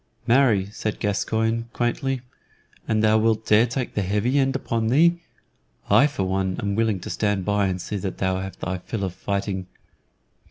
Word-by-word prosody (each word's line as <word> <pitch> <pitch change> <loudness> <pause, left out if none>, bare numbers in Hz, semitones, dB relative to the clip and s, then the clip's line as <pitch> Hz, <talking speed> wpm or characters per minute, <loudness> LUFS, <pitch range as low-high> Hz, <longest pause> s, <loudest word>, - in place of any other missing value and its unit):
"Marry," 120 -5 +4
said 110 0 -4
Gascoyne, 115 +3 -1
quaintly, 125 +2 -1 0.7
"an 110 -1 +1
thou 110 0 +4
wilt 110 0 +1
dare 110 +3 +5
take 125 +1 -3
the 105 - 0
heavy 105 +8 +1
end 135 0 +1
upon 115 -4 -1
thee, 170 +8 +4 0.7
I 110 +8 +6
for 140 -9 -3
one 95 0 -1
am 100 0 -1
willing 110 -2 +1
to - - -7
stand 105 -3 0
by 105 -1 +2
and 90 -1 -2
see 105 - -4
that 95 -1 -4
thou 95 -1 0
have 95 -1 -6
thy 95 -1 -3
fill 100 +3 -5
of 95 -2 -2
fighting." 100 -1 -3
105 Hz, 175 wpm, -24 LUFS, 95-115 Hz, 0.7 s, I